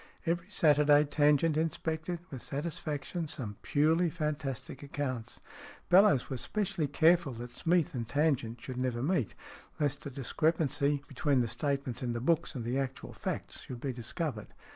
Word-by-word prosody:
Every 170 +2 -1
Saturday 150 -5 +5
Tangent 150 +1 +3
inspected, 160 +1 -1
with 130 -3 -6
satisfaction, 155 +3 -3
some 110 -8 -5
purely 160 +4 +3
fantastic 145 -5 -3
accounts. 130 -5 -4 0.5
Bellowes 185 - +6
was 130 -3 -4
specially 195 -7 -1
careful 160 0 +4
that 120 +1 -8
Smeath 170 -2 +2
and 120 -3 -4
Tangent 135 -6 +1
should 130 -2 -6
never 125 -1 -1
meet, 150 - 0 0.4
lest 145 -1 0
the 140 - -6
discrepancy 145 +1 0
between 135 0 +1
the 120 - 0
statements 130 +1 -2
in 120 -2 -1
the 120 - -2
books 160 +4 +1
and 125 - -3
the 125 +3 0
actual 135 -1 -4
facts - - -4
should 125 - -7
be 135 -2 -2
discovered. 125 - -4
145 Hz, 150 wpm, -31 LUFS, 130-160 Hz, 0.5 s, Bellowes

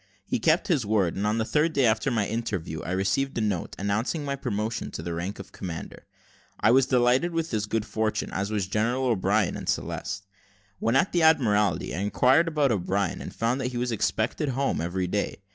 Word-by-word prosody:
He - - -1
kept 155 +9 +2
his 155 -9 +2
word, 100 -5 +1
and 100 +2 -1
on 110 +1 +1
the 110 - 0
third 155 +6 +1
day 135 - +3
after 110 +2 +2
my 115 -5 +1
interview, 100 -8 -3
I - - -6
received 95 +9 0
a - - +1
note, 105 -5 -2
announcing 110 - -1
my 140 0 -1
promotion 110 -4 -3
to 80 - -6
the 85 0 -3
rank 90 +5 -4
of 95 -1 -10
commander. 85 -5 -7 0.5
I 110 - +4
was 130 +1 +5
delighted 125 +6 +3
with 165 0 -2
this 110 -2 -1
good 110 0 -1
fortune, 110 -1 -2
as 100 +2 -1
was 105 -3 -1
General 115 +7 0
O'Brien 105 -3 +1
and - - -5
Celeste. 100 +1 -3 0.5
When 115 +3 +1
at 135 - +3
the 175 - +2
Admiralty, 105 - +3
I 80 - -3
inquired 125 - +3
about 150 -5 +2
O'Brien, 100 -1 -1
and - - -6
found 120 +4 -1
that 125 0 -2
he - - -3
was 120 0 -1
expected 115 +6 0
home 135 -5 0
every 90 +2 -1
day. 100 +1 -2
110 Hz, 210 wpm, -26 LUFS, 100-130 Hz, 0.5 s, was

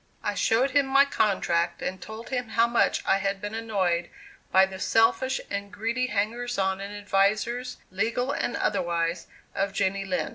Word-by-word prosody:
I 205 - 0
showed 230 +7 +2
him 280 0 +3
my 275 +1 +5
contract 175 -9 0
and 185 +1 -4
told 220 +2 -8
him 250 -3 -2
how 230 +1 +3
much 235 0 +1
I 195 - +3
had 195 0 -1
been 205 +2 -5
annoyed 195 -6 -1 0.4
by 190 0 +6
the 190 0 -9
selfish 225 +6 +2
and 200 0 -4
greedy 235 +4 -1
hangers 235 +3 -2
on 190 0 0
and 200 +1 -6
advisers, 205 +5 0
legal 230 +7 0
and 245 - -2
otherwise, 170 -3 -1 0.3
of 195 0 -1
Jenny 195 0 0
Lind. 185 -2 -2
205 Hz, 170 wpm, -26 LUFS, 190-235 Hz, 0.4 s, by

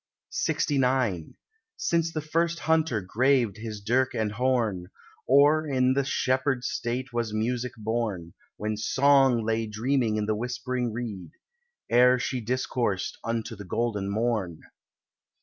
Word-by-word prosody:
LXIX 125 - 0 0.4
Since 165 -1 0
the 155 - -3
first 165 +2 0
hunter 160 -8 +1
graved 120 +2 +1
his 110 -1 -6
dirk 125 +5 +1
and 110 -2 -1
horn, 110 -6 0 0.4
Or 145 +3 +5
in 130 -2 +2
the 140 +1 +1
shepherd 130 -1 0
state 125 +2 -3
was 115 -2 -2
music 120 +3 -1
born— 110 -6 -3 0.2
When 105 0 -3
Song 135 +1 +3
lay 115 0 0
dreaming 115 +1 0
in 105 - -1
the 110 - 0
whispering 120 +2 -3
reed, 105 -7 -6 0.5
Ere 125 +1 +5
she 125 0 -2
discoursed 120 -4 -2
unto 115 0 -3
the 105 - -9
golden 105 0 -2
morn. 105 -6 -1
120 Hz, 130 wpm, -27 LUFS, 110-130 Hz, 0.5 s, Or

